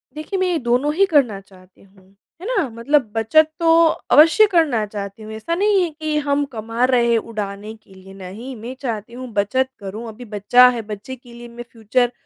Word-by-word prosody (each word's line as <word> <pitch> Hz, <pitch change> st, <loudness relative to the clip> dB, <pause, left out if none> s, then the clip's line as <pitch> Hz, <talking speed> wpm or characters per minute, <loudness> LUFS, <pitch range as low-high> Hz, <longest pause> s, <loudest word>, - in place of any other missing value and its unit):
देखिए 310 Hz, +6 st, -4 dB
मैं 375 Hz, -, +1 dB
ये 350 Hz, -, 0 dB
दोनों 250 Hz, +5 st, 0 dB
ही 395 Hz, +3 st, +4 dB
करना 270 Hz, -, +1 dB
चाहती 185 Hz, -1 st, -21 dB
हूँ। 195 Hz, 0 st, -24 dB, 0.3 s
है -, -, -8 dB
ना, 395 Hz, -, 0 dB
मतलब 235 Hz, +1 st, 0 dB
बचत 305 Hz, +8 st, +3 dB
तो 330 Hz, 0 st, +5 dB, 0.3 s
अवश्य 330 Hz, +8 st, +7 dB
करना 305 Hz, -, +1 dB
चाहती 200 Hz, +1 st, -8 dB
हूँ। 215 Hz, -, -9 dB
ऐसा 220 Hz, +11 st, -3 dB
नहीं 400 Hz, 0 st, +2 dB
है 345 Hz, -, -2 dB
कि 310 Hz, -1 st, -3 dB
हम 285 Hz, 0 st, +1 dB
कमा 230 Hz, -2 st, -4 dB
रहे 245 Hz, -2 st, +2 dB
हैं 230 Hz, -, +3 dB
उड़ाने 210 Hz, -1 st, -6 dB
के 220 Hz, -3 st, -22 dB
लिए। 190 Hz, 0 st, -15 dB
नहीं, 200 Hz, +7 st, -9 dB
मैं 235 Hz, +4 st, -8 dB
चाहती 230 Hz, -3 st, -5 dB
हूँ 255 Hz, +1 st, -8 dB
बचत 260 Hz, +6 st, 0 dB
करूँ। 205 Hz, +4 st, -7 dB
अभी 225 Hz, +3 st, -11 dB
बच्चा 220 Hz, +4 st, +4 dB
है, 240 Hz, -2 st, -3 dB
बच्चे 215 Hz, +4 st, -8 dB
के 245 Hz, -1 st, -17 dB
लिए 240 Hz, 0 st, -11 dB
मैं 235 Hz, 0 st, -10 dB
फ्यूचर 235 Hz, +2 st, 0 dB
235 Hz, 205 wpm, -20 LUFS, 210-290 Hz, 0.3 s, अवश्य